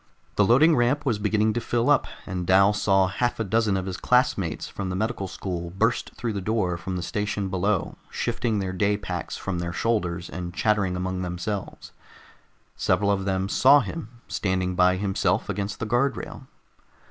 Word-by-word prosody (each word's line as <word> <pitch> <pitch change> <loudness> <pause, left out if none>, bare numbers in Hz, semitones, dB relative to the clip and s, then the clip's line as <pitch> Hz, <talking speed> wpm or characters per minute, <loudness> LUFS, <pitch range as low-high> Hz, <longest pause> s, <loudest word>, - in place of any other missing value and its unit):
The 105 - +4
loading 135 +10 +5
ramp 125 +5 +1
was 115 -6 +1
beginning 105 +1 +1
to 120 - -1
fill 120 +1 0
up, 145 -1 +4 0.2
and 90 -2 -4
Dal 95 +2 +5
saw 95 -2 +3
half 120 +7 -1
a - - +1
dozen 110 -1 +1
of 95 - -3
his 95 -1 -4
classmates 105 - +1
from 95 -2 -5
the 90 - -3
medical 110 -1 -2
school 85 -2 -5
burst 110 +7 -1
through 115 -2 -3
the 100 - -3
door 95 -3 0
from 90 +2 -5
the 90 - -3
station 105 +1 -2
below, 95 -2 -1
shifting 115 -3 -1
their 95 -2 -2
day 100 +2 +1
packs 90 -5 -5
from 95 -3 -3
their 85 0 -3
shoulders 90 -4 -1
and 90 -1 -6
chattering 105 -4 +1
among 90 0 -2
themselves. 90 +3 -5 0.8
Several 100 -1 +1
of 95 -1 0
them 95 -1 0
saw 135 +7 +6
him, 140 -10 -6 0.2
standing 95 -2 -1
by 90 0 +4
himself 95 0 0
against 100 +1 -3
the 115 - -2
guard 120 +3 +1
rail. - - -8
100 Hz, 180 wpm, -25 LUFS, 90-110 Hz, 0.8 s, saw